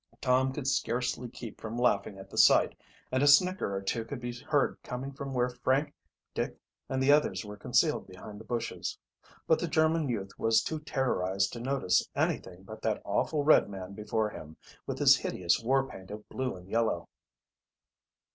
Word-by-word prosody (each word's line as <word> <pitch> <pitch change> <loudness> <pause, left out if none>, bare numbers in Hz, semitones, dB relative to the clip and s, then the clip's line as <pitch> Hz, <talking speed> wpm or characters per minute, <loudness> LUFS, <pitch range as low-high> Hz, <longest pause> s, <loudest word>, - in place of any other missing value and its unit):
Tom 130 +1 +2
could 135 0 -5
scarcely 125 -1 -1
keep 115 -2 -9
from 115 +1 -5
laughing 105 -4 +1
at 95 - -10
the - - -9
sight, - - +6 0.4
and 130 +1 +1
a 145 - +4
snicker 180 - +4
or 95 - -3
two 115 +4 -1
could 120 +3 -6
be 120 0 -4
heard 140 +3 0
coming 130 +2 -5
from 140 0 -6
where 125 -1 +1
Frank, 130 +4 0 0.4
Dick, - - -3 0.3
and 130 0 0
the 140 - +5
others 110 -10 +2
were 105 0 -7
concealed 105 - +1
behind 105 +3 -10
the - - -10
bushes. 120 +1 -3 0.5
But 160 - +3
the 175 - -1
German 160 -2 +2
youth 100 -5 -3
was 115 0 +3
too 160 - -3
terrorized 100 -10 0
to 120 - -6
notice 120 -7 +1
anything 90 0 -2
but 110 +3 -10
that 110 -2 -1
awful 145 +9 0
red 150 -7 +5
man 95 -1 -7
before 105 +1 -1
him, 80 -4 -10 0.3
with - - -3
his - - +6
hideous 90 -1 0
war 135 +3 +2
paint 95 -6 -11
of 105 +1 -8
blue 130 -4 -3
and 90 0 -13
yellow. 115 +2 0
120 Hz, 185 wpm, -30 LUFS, 100-135 Hz, 0.5 s, sight